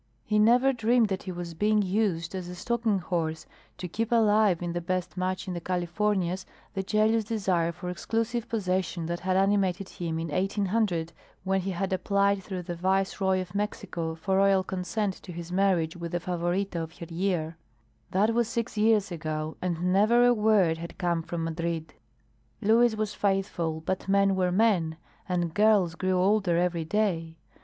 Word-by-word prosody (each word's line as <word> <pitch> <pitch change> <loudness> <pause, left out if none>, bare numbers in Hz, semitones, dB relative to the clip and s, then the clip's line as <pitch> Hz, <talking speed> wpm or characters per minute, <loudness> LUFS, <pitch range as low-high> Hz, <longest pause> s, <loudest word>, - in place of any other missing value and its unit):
He 210 0 +2
never 245 +5 +5
dreamed 230 -1 +2
that 190 -1 -2
he 185 - -6
was 175 -1 -6
being 210 +4 +2
used 185 -4 0
as 185 -2 -5
a 180 - -7
stalking 230 +1 0
horse 160 -3 -2 0.3
to 180 - -5
keep 225 +6 -3
alive 215 -5 +3
in 175 -1 -3
the 175 - -2
best 185 0 -2
match 185 +1 -2
in 185 - -3
the 175 - -4
Californias 185 +1 -1 0.3
the 195 - -1
jealous 215 +3 +2
desire 190 -6 0
for 175 +1 -8
exclusive 225 +6 -2
possession 185 -5 -1
that 170 +1 -3
had 185 +1 0
animated 195 -1 +1
him 165 -2 -4
in 165 0 -3
1800 190 -1 0 0.3
when 190 0 +1
he 190 - -3
had 190 +1 -2
applied 200 +1 +1
through 185 -2 -5
the 175 0 -5
Viceroy 190 +1 +1
of 180 -1 -8
Mexico 200 -5 -3
for 190 +4 -1
royal 195 -1 +4
consent 190 +2 -2
to 180 - -9
his 170 0 -7
marriage 180 -4 +1
with 170 -1 -6
the 175 - +1
Favorita 175 +1 -2
of 160 0 -8
her 170 - -7
year. 170 -2 -1 0.5
That 210 +4 +2
was 235 -1 +2
six 230 +1 -3
years 210 -2 +3
ago 155 -1 -4
and 180 0 0
never 230 +5 +5
a 245 - +6
word 210 -7 +3
had 170 0 -8
come 175 -3 0
from 165 0 -4
Madrid. 165 0 -3 0.7
Luis 225 +2 +4
was 215 -1 -2
faithful, 190 -5 -1
but 185 +4 -3
men 195 0 +4
were 180 -1 +1
men, 180 -6 +2 0.3
and 175 -2 -1
girls 205 -4 +4
grew 185 +1 -1
older 190 -2 +2
every 175 -2 0
day. 165 -4 -1
185 Hz, 175 wpm, -27 LUFS, 170-210 Hz, 0.7 s, a